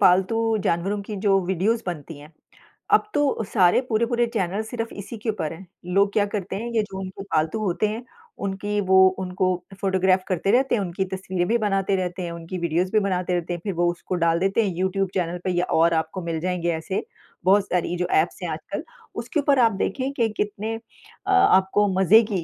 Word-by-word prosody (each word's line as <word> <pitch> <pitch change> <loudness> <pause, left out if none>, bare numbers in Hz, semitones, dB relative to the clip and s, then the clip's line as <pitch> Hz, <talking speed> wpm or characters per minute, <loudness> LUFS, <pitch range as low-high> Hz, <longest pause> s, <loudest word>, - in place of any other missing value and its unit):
पालतू 190 +4 +4 0.2
जानवरों 195 +5 0
की 210 +1 -6
जो 195 -1 +5
वीडियोज़ 205 +6 +1
बनती 160 -3 -6
हैं, 150 +2 -14 0.6
अब 425 0 +4
तो 285 -7 +1
सारे 185 +2 +5
पूरे-पूरे 235 +1 +2
चैनल 195 0 -1
सिर्फ 225 0 -5
इसी 205 +3 -7
के 220 +2 -4
ऊपर 185 -8 -2
हैं। 180 +4 -11 0.3
लोग 200 0 +4
क्या 205 -2 +3
करते 200 -2 -4
हैं, 230 +4 -4
ये 220 -2 +2
जो 190 -2 -7
उनके 190 +1 -7
पालतू 160 +1 0
होते 190 +2 +1
हैं, 225 +4 -5 0.4
उनकी 205 +2 -2
वो 190 0 +5 0.2
उनको 185 0 -1 0.4
फोटोग्राफ 190 -1 +2
करते 185 +1 0
रहते 260 +2 +3
हैं, 210 - 0
उनकी 190 +1 -2
तस्वीरें 185 -2 -2
भी 235 +2 +3
बनाते 195 -2 +1
रहते 185 0 -3
हैं, 170 - -4
उनकी 170 +2 -6
वीडियोज़ 170 +2 0
भी 215 - +4
बनाते 180 -1 -1
रहते 175 0 -1
हैं, 175 - -4
फिर 200 -3 -2
वो 175 +1 +2
उसको 175 +1 -5
डाल 165 0 +3
देते 195 +5 +2
हैं 190 - -1
यूट्यूब 190 +1 0
चैनल 175 -1 -1
पे। 185 - 0
ये 175 0 +1 0.2
और 165 +1 +4
आपको 160 +3 -1
मिल 165 -1 -2
जाएँगे 175 0 -1
ऐसे 160 +4 -3 0.4
बहुत 200 +1 +4
सारी 175 0 0
जो 180 - 0
ऐप्स - - -1
हैं - - -2
आजकल, - - -5 0.3
उसके 310 - -2
ऊपर 280 -2 +3
आप 230 -2 +5
देखें 270 0 -1
कि 235 -5 +1
कितने 210 +2 -2
अ, 230 - -9
आपको 205 - +4
मज़े 210 +5 +7
की 180 -4 -1
190 Hz, 205 wpm, -24 LUFS, 180-215 Hz, 0.6 s, मज़े